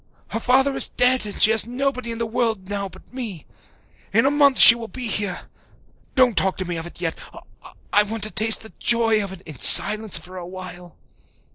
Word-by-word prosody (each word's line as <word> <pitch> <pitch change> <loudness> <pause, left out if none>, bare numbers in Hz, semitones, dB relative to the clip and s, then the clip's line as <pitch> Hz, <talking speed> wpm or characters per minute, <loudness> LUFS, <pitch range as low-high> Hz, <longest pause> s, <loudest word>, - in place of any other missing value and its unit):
Her 225 - -5
father 265 +3 0
is - - +1
dead 250 -3 +2
and 205 - -9
she 215 - +5
has 220 0 +1
nobody 255 -1 -4
in 230 - -7
the 230 - -4
world 225 -4 -4
now 200 -1 -5
but 190 +7 -20
me. 220 - -8 0.7
In 225 +5 +1
a 275 - +1
month 285 -2 +2
she - - +10
will 235 -1 -9
be 255 +2 -9
here. 205 -4 -3 0.7
Don't 255 -4 +2
talk 190 -1 -1
to 185 - -4
me 175 -1 -5
of 165 +1 -7
it 175 - -14
yet 165 -2 -2 0.8
I 205 - +4
want 210 +1 -6
to 215 - +2
taste 220 +3 +4
the 220 - -13
joy 225 -2 +1
of 195 - -7
it 190 -2 -12
in 150 -8 -12
silence 215 -1 +5
for 185 +1 -13
a 175 -1 -9
while." 180 -1 -10
220 Hz, 215 wpm, -20 LUFS, 190-240 Hz, 0.8 s, she